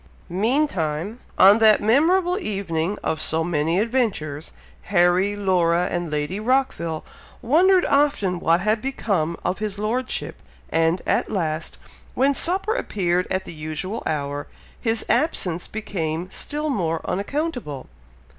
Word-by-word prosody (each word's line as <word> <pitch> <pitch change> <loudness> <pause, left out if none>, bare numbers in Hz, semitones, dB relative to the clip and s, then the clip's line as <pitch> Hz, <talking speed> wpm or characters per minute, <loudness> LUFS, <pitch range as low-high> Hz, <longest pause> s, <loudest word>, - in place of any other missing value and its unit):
Meantime, 200 - 0 0.2
on 200 +3 +7
that 220 -1 +6
memorable 350 - +3
evening 195 - -2
of 155 - -1
so 160 +1 0
many 165 0 0
adventures, 205 - -1 0.3
Harry, 185 +1 +3
Laura, 180 -3 +2
and 175 -1 -2
Lady 150 +6 -2
Rockville, 215 -10 0 0.4
wondered 355 +9 +4
often 275 -11 +2
what 170 +1 +2
had 215 +2 +1
become 195 -11 -1
of 190 - -1
his 210 -2 -3
Lordship, 235 +5 -3 0.3
and, 165 +2 +1
at - - +1
last, 165 -5 -2 0.4
when 275 +2 +3
supper 380 +9 0
appeared 180 - 0
at 190 0 -1
the - - -8
usual 155 +7 -4
hour, 145 -2 -3 0.3
his 225 -1 0
absence 180 - 0
became 180 -4 -4
still 300 0 -3
more 165 -8 -1
unaccountable! 205 - -3
195 Hz, 125 wpm, -23 LUFS, 165-245 Hz, 0.4 s, on